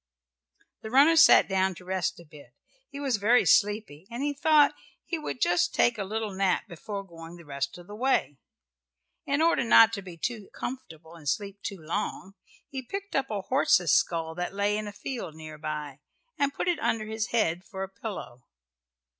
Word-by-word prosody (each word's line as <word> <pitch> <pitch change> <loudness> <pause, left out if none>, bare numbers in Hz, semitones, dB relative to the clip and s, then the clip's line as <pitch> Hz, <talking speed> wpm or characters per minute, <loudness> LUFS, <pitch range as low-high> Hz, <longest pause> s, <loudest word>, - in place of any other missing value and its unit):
The 220 - -7
runner 280 +7 +6
sat 325 - +7
down 190 -1 +1
to 180 - -13
rest 185 -2 -2
a 170 - -13
bit. 150 -1 -16 0.3
He 280 - -8
was 270 -5 0
very 225 +5 +4
sleepy 205 -6 +2
and 240 +4 -4
he 290 0 0
thought 295 +1 +4 0.3
he 335 - -3
would 300 - -5
just 180 -3 +2
take 240 -2 +3
a - - -1
little 215 +1 -3
nap 190 -1 +1
before 200 +3 -6
going 165 -2 -11
the 170 -1 -14
rest 140 +2 -4
of 175 - -13
the 205 - -11
way. 215 - 0 0.9
In 285 +3 +2
order 335 -5 +3
not 225 -1 +7
to 200 - -3
be 180 -3 -11
too 215 +3 -4
comfortable 165 -11 -7
and 155 -4 -5
sleep 200 +3 -3
too 200 - -5
long 190 +3 -4 0.3
he 265 -1 -5
picked 395 +10 -6
up 270 -1 0
a 210 -2 -2
horse's 190 - +3
skull 165 -1 +1
that 180 +3 -4
lay 205 +1 +1
in 215 0 -3
a - - -5
field 205 - -6
near 155 -1 -10
by 150 -2 -5 0.4
and 280 -1 +1
put - - -4
it 350 -4 +1
under 225 -6 0
his 220 0 -3
head 180 -7 0
for 195 -2 -6
a - - -4
pillow. 190 - -8
200 Hz, 195 wpm, -27 LUFS, 170-240 Hz, 0.9 s, sat